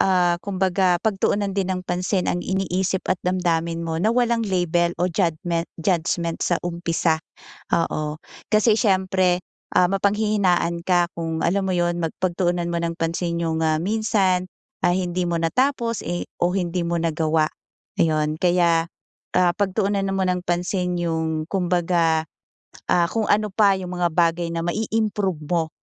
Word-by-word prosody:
ah, 180 -2 +3
kumbaga 185 -2 +1
pagtuunan 200 -1 +1
din 190 -1 -1
ng 180 0 -3
pansin 180 +1 -1
ang 175 - 0
iniisip 190 0 -1
at 185 - +1
damdamin 170 -2 -1
mo 160 0 -2
na 210 - +2
walang 235 -1 +2
label 175 -2 +1
o 175 - 0
jadmen 170 -1 0
judgement 170 -1 -1
sa 175 - +1
umpisa, 170 -2 0 0.5
oo. 155 -2 -1 0.3
Kasi 215 +1 +4
siyempre, 185 -4 +2 0.3
ah, 180 - +4
mapanghihinaan 195 -4 +1
ka 175 -2 +3
kung 165 -1 -3
alam 195 +3 +1
mo 190 - 0
'yon, 175 -1 +1
mag 165 -2 -2
pagtuunan 175 -1 0
mo 170 - -2
ng 170 0 -2
pansin 170 +1 -1
yung, 160 -1 0
ah, 155 0 +1
minsan, 195 -2 +1 0.4
ah, 175 - +4
hindi 180 -1 -1
mo 170 -1 -1
natapos, 235 +5 0
eh 175 +1 -3
o 175 +1 +2
hindi 180 -2 -1
mo 170 0 -1
nagawa, 160 -1 +1 0.5
ayon. 155 -1 +1
Kaya, 175 -2 +3 0.5
ah, 175 -1 +4
pagtuunan 200 0 0
mo 195 0 0
ng 180 0 -1
pansin 180 +1 -1
yung 160 -2 -1
kumbaga, 175 -3 +1 0.7
ah, 170 -1 +4
kung 225 -2 0
ano 210 0 +2
pa 200 -2 +5
yung 180 -1 -6
mga 175 - +3
bagay 170 0 +2
na 165 0 -2
ma-i-improve 210 -2 -1
mo, 165 -1 0
175 Hz, 150 wpm, -23 LUFS, 170-190 Hz, 0.7 s, pa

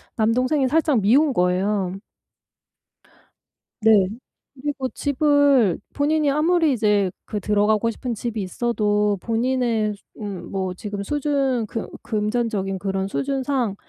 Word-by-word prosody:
남동생이 255 +5 +2
살짝 300 -4 +2
미운 270 +8 +4
거예요. 185 0 +1 1.9
네. 210 -4 +6 0.6
그리고 285 -3 -2
집을 285 - +2
본인이 300 0 +2
아무리 320 +1 +2
이제 210 -5 +2
그 210 - -4
들어가고 210 +3 +2
싶은 240 +2 -4
집이 225 0 -4
있어도 210 -1 0
본인의 230 -2 0
수 200 - -18 0.2
음 205 -1 -4 0.2
뭐 190 -2 -2
지금 205 +1 -5
수준 275 -1 0
금 225 +1 -5
금전적인 210 -3 -1
그런 195 0 -2
수준상 265 -3 -1
230 Hz, 245 characters per minute, -22 LUFS, 205-275 Hz, 1.9 s, 네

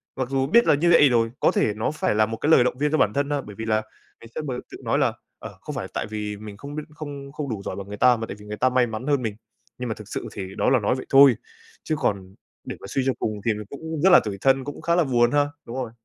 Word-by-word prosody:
mặc 130 -1 -3
dù 135 -1 0
biết 235 +10 +5
là - - +5
như 170 +4 +2
vậy 145 -4 +7
rồi, 115 -2 +2
có - - +4
thể 105 - +1
nó 110 +6 -1
phải 150 -8 -1
là 110 - +4
một 115 +1 -5
cái 150 - -1
lời 125 - +7
động 125 0 -1
viên 150 +1 0
cho 155 - +2
bản 105 -7 +2
thân 140 +1 0
ha. 145 -1 0
Bởi 105 -4 -11
vì 110 - -5
là 110 -1 +1 0.4
ngày 115 - -13
xưa - - -2
m 150 - -7 0.2
tự - - -8
nói - - +1
là, - - +2 0.3
ờ, - - -10
không - - -7
phải - - -3
là - - -6
tại - - -2
vì 105 -1 -4
mình 105 -1 -9
không 145 +1 -8
biết 155 - -4
không 140 -2 -8
không 145 -2 -5
đủ 105 -4 -4
giỏi - - -4
bằng 100 0 -7
người 105 - -7
ta 125 +2 +5
mà 115 - -4
tại - - -6
vì 105 - -13
người 105 0 -6
ta 130 - +3
may 125 -1 +2
mắn 110 +5 -6
hơn 140 -3 +2
mình. 110 -3 -3 0.4
Nhưng 125 -1 -4
mà 110 - -2
thực 105 -2 -11
sự - - -5
thì 95 -1 -7
đó - - +2
là 130 -2 +4
nói 105 +4 +1
vậy 130 - -6
thôi, 135 -3 +7 0.5
chứ 155 - -1
còn 95 -1 -2 0.3
để - - -6
mà - - -11
suy 135 - -1
cho 130 - +2
cùng 105 -2 -3
thì 115 - +3
mình 105 0 -7
cũng 160 +1 -6
rất 190 - +5
là 180 - +9
tủi 100 -2 -4
thân, 135 0 +3
cũng 145 +1 -7
khá 170 0 +1
là 175 - +4
buồn 120 -4 +2
ha. 145 0 +3 0.2
Đúng 115 - -7
rồi. 125 -4 -4
125 Hz, 320 wpm, -24 LUFS, 110-145 Hz, 0.5 s, là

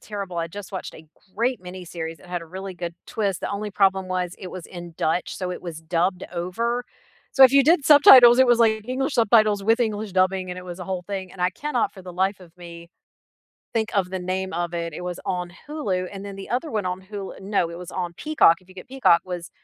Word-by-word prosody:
terrible. 200 -4 -6
I 165 0 -2
just 200 +2 -9
watched 190 - -6
a 160 - -13 0.3
great 240 -1 0
miniseries, 170 -3 -7
it - - -17
had 175 -1 -4
a - - -11
really 190 +2 -7
good 170 -1 -5
twist. 200 -5 -2
The - - -3
only 205 +1 -4
problem 190 -1 +2
was 180 -1 -2
it 185 - -8
was 185 -3 -8
in 175 -2 -10
Dutch, 160 +3 -1
so 185 -1 -3
it 180 - -6
was 165 -2 -7
dubbed 175 +3 -1
over. 230 +8 -2 0.5
So, 270 - +8
if 260 - +6
you 275 0 +6
did 315 -1 +4
subtitles, 260 -4 +9
it 260 - +6
was 240 -1 +4
like 220 0 +2
English 270 +2 -1
subtitles 215 -3 +4
with 225 +4 +3
English 215 -4 -2
dubbing, 185 0 +1
and 180 - -6
it 180 - -9
was 180 0 -8
a 180 - -5
whole 185 -2 -3
thing, 190 -2 -5
and 180 - -12
I 180 +1 +2
cannot 255 +2 -2
for 190 - -13
the 180 -1 -9
life 190 +2 0
of 175 -1 -17
me 170 -1 -11 0.8
think 225 -1 0
of 185 -2 +1
the 190 - -3
name 185 0 -3
of 175 0 -2
it. 170 -1 -3
It 180 - -7
was 180 -1 -5
on 180 -2 -3 0.2
Hulu 195 -12 -2
and 195 0 -7
then 200 -1 -7
the 195 - -8
other 260 +6 -1
one 210 -4 -2
on 180 +1 -3
Hul 200 0 -7
no, 190 -4 0
it 170 - -8
was 180 0 -8
on 175 -2 -4
Peacock, 300 - +3
if 185 - -25
you 185 - -16
get 185 - -10
Peacock, 255 -10 +3
was, 175 -2 -6
185 Hz, 245 wpm, -23 LUFS, 180-215 Hz, 0.8 s, subtitles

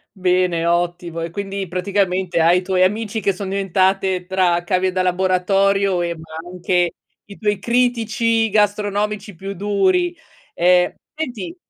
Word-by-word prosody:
Bene, 180 -2 +1
ottimo, 170 -1 -1
e 165 - -3
quindi 195 +2 -4
praticamente 185 -1 0
hai 170 +2 +5
i - - 0
tuoi 185 0 0
amici 215 +3 0
che 200 - +2
son 195 +1 -6
diventate 190 -1 +1
tra 180 -2 +1
cavie 185 +1 +1
da 185 0 0
laboratorio, 190 +1 +2
ehm, 170 -1 -2
ma 160 +1 -9
anche 180 -1 0 0.3
i 200 - -12
tuoi 210 -2 -1
critici 230 -1 +1
gastronomici 205 -1 0
più 195 +4 -6
duri. 345 - +1 0.4
Ehm, 180 0 +3 0.2
senti, 265 - -5
190 Hz, 140 wpm, -20 LUFS, 180-205 Hz, 0.4 s, hai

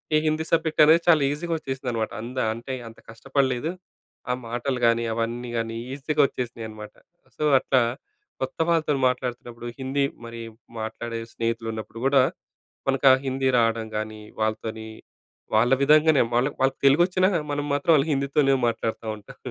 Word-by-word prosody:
ఈ - - +6
హిందీ 155 +1 0
సబ్జెక్ట్ 160 -1 +2
అనేది 160 +2 +6
చాలా 160 -3 +6
ఈజీగా 165 +3 -3
వచ్చేసిందనమాట. 125 -5 -3
అంత 125 +2 -8 0.2
అంటే, 120 +3 -6 0.2
అంత 115 - -16
కష్టపడలేదు. 135 +4 -1 0.6
ఆ - - +2
మాటలు 120 +2 -2
గాని, 115 0 +2
అవన్నీ 115 +2 -3
గాని, 115 0 -3 0.2
ఈజీగా 150 +2 0
వచ్చేసినాయనమాట. 110 -4 -7 0.4
సో, 150 - -3 0.2
అట్లా 130 -2 +3 0.6
కొత్త 130 - -4
వాళ్ళతో 160 -3 +2 0.2
మాట్లాడుతున్నప్పుడు 120 -2 -5
హిందీ 135 +2 0 0.2
మరి, 115 0 -8 0.4
మాట్లాడే 115 +1 -5
స్నేహితులు 115 0 -2
ఉన్నప్పుడు 110 +1 -7
కూడా, 135 0 +5 0.7
మనకు 135 +1 +1
ఆ - - +8
హిందీ 130 0 0
రావడం 115 -1 +1
గానీ, 110 0 -5 0.2
వాళ్ళతోని 110 0 -2 0.7
వాళ్ళ 120 +4 +4
విధంగానే 150 0 +5
వాళ్ళాక్ 130 +4 +1
వాళ్ళకి 135 0 +1
తెలుగొచ్చినా, 175 +6 +4 0.2
మనం 145 0 -2
మాత్రం 145 +3 +2
వాళ్ల 140 -2 +3
హిందీతోనే 140 0 +2
మాట్లాడుతుంటాం. 110 -2 -4
130 Hz, 140 wpm, -25 LUFS, 115-145 Hz, 0.7 s, ఆ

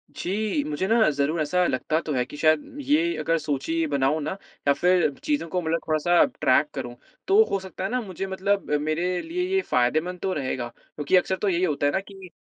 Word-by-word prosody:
जी, 195 -4 -1
मुझे 150 +5 -2
ना 225 0 +4
ज़रूर 145 +3 0
ऐसा 180 +4 +1
लगता 155 +5 0
तो 155 - -4
है 125 -2 +1
कि 145 - -11
शायद, 155 - +1
ये 315 +5 +2
अगर 165 0 +1
सोचिए, 155 +2 -2
ये 160 - +1
बनाऊँ 140 +2 +1
ना, 150 - -3 0.4
या 140 - +6
फिर 180 +2 +3
चीज़ों 295 - -1
को 180 +2 -2
मतलब 165 +1 0
थोड़ा-सा 160 +3 +4 0.2
ट्रैक 145 +1 +3
करूँ, 120 0 -5 0.3
तो 410 +3 +6
हो 195 - +1
सकता 190 0 -8
है 190 - -1
ना, 250 +1 -1
मुझे 195 -3 -5
मतलब 195 0 -1
मेरे 175 +4 -1
लिए 350 +2 -3
ये 385 - +3
फ़ायदेमंद 155 - 0
तो 190 - -1
रहेगा, 130 -5 -3 0.3
क्योंकि 150 +5 +1
अक्सर 190 +1 +1
तो 205 - +2
यही 175 0 0
होता 150 -5 0
है 145 - +3
ना 190 - +2
कि 195 -2 -12
170 Hz, 215 wpm, -25 LUFS, 150-195 Hz, 0.4 s, या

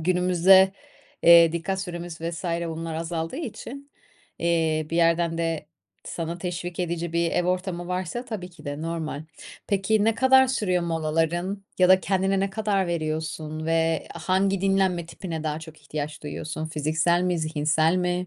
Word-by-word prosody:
günümüzde, 185 +2 +5 0.5
eee, 170 -1 +8
dikkat 175 +3 -2
süremiz 175 -3 -6
vs. 165 +2 -5
bunlar 165 -1 -3
azaldığı 165 +4 -3
için, 280 -1 -7 0.5
eee, 160 -2 +1
bir 165 - -1
yerden 165 0 +2
de 165 -2 -2 0.4
sana 170 0 -4
teşvik 175 0 -4
edici 170 -1 -2
bir 170 0 +1
ev 180 - +1
ortamı 180 -1 -2
varsa, 185 +6 -3
tabii 210 -7 -6
ki 170 -4 -16
de 145 +1 -5
normal. 160 -3 -4 0.4
Peki 205 +2 +1
ne 225 0 +3
kadar 265 +2 +5
sürüyor 195 -9 0
molaların 165 +4 -1
ya 180 -1 +5
da 185 0 +7
kendine 190 0 +1
ne 195 0 0
kadar 200 -2 0
veriyorsun 155 -1 -3
ve 165 -1 +1
hangi 195 +1 +1
dinlenme 190 -3 +1
tipine 165 -2 -6
daha 155 0 -1
çok 160 -1 -12
ihtiyaç 150 +1 -5
duyuyorsun? 155 +1 -5
Fiziksel 160 +3 +1
mi? 180 -1 0
Zihinsel 155 +1 +1
mi? 180 0 -1
170 Hz, 150 wpm, -25 LUFS, 160-185 Hz, 0.5 s, eee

